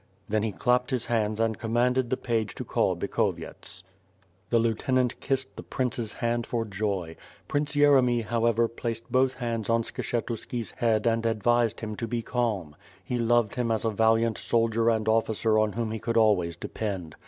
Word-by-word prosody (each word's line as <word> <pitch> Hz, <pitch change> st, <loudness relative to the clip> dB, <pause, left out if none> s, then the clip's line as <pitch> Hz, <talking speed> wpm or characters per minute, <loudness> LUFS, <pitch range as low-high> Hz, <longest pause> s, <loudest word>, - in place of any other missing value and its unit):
Then 110 Hz, +1 st, +1 dB
he 110 Hz, 0 st, -1 dB
clapped 125 Hz, +4 st, +1 dB
his 125 Hz, -3 st, -1 dB
hands 110 Hz, -2 st, 0 dB
and 115 Hz, -1 st, 0 dB
commanded 120 Hz, +2 st, +1 dB
the 130 Hz, -, 0 dB
page 110 Hz, -5 st, -2 dB
to -, -, -5 dB
call -, -, +1 dB
Bikhovyets. 95 Hz, -, -3 dB, 0.7 s
The 120 Hz, -, +3 dB
lieutenant 120 Hz, +2 st, +1 dB
kissed 135 Hz, -1 st, -2 dB
the -, -, -7 dB
prince's 120 Hz, -4 st, -2 dB
hand 120 Hz, 0 st, -1 dB
for 115 Hz, -2 st, -1 dB
joy. 95 Hz, -5 st, -3 dB, 0.3 s
Prince 145 Hz, +1 st, -1 dB
Yeremy, 130 Hz, -5 st, +4 dB
however, 115 Hz, 0 st, +2 dB
placed 115 Hz, 0 st, -5 dB
both 130 Hz, +1 st, +3 dB
hands 115 Hz, -4 st, -3 dB
on 115 Hz, 0 st, +3 dB
Skshetuski's 115 Hz, 0 st, -4 dB
head 110 Hz, -3 st, +1 dB
and 115 Hz, -1 st, +2 dB
advised 115 Hz, 0 st, +1 dB
him 110 Hz, -1 st, -4 dB
to 115 Hz, -, -3 dB
be 115 Hz, 0 st, -2 dB
calm. 105 Hz, -13 st, -2 dB, 0.3 s
He 125 Hz, -, -2 dB
loved 115 Hz, -2 st, +2 dB
him 120 Hz, -2 st, -1 dB
as 110 Hz, -1 st, 0 dB
a 110 Hz, -, +2 dB
valiant 115 Hz, +1 st, +2 dB
sol 115 Hz, 0 st, +1 dB
dier 115 Hz, +1 st, +2 dB
and 110 Hz, -1 st, 0 dB
officer 110 Hz, 0 st, +2 dB
on 110 Hz, -1 st, +1 dB
whom 115 Hz, -2 st, -2 dB
he 110 Hz, -, -3 dB
could 115 Hz, +2 st, -1 dB
always 95 Hz, -7 st, +3 dB
depend. 95 Hz, -3 st, -5 dB
115 Hz, 175 wpm, -27 LUFS, 110-120 Hz, 0.7 s, Yeremy